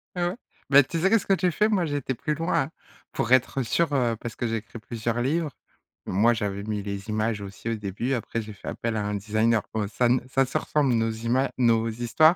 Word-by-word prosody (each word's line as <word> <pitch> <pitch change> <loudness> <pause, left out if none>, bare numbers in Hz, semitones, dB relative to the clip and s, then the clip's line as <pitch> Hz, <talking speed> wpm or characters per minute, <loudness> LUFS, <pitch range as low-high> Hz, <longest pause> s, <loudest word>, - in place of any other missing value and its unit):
Ah 175 -1 +1
ouais, - - -5 0.3
mais 145 0 +8
tu 165 +5 -3
sais 190 - +4
qu'est-ce 220 -2 +3
que 195 - +3
tu 180 -1 +2
fais, 210 +6 +2
moi 195 -5 +2
j'ai 145 -2 -2
été 135 -2 -2
plus 150 +5 -2
loin, 165 +1 +1
hein, - - -10 0.4
pour 120 - -1
être 130 +1 +3
sûr, 165 +7 +1
heu, 120 -4 +2
parce 115 - -5
que 120 - -2
j'ai 115 0 -1
écrit 115 +2 -9
plusieurs 115 +1 -2
livres. 155 +5 0 0.6
Moi, 110 +6 +3
j'avais 100 -3 -3
mis 105 -1 -3
les 100 0 -5
images 110 0 0
aussi 100 +3 -6
au 115 - 0
début, 105 +5 -3
après 115 -2 -2
j'ai 110 -1 -8
fait 100 - -13
appel 115 -1 -2
à 105 - -1
un 105 - -1
designer, 110 +2 +1
bon 105 -2 -1
ça 120 +4 +1
ne 125 +2 +4
ça 135 0 +3
se 130 - -12
ressemble 140 -5 +1
nos 115 0 +2
ima 120 +4 0
nos 115 -2 +3
histoires 120 +9 +4
120 Hz, 245 wpm, -26 LUFS, 110-140 Hz, 0.6 s, mais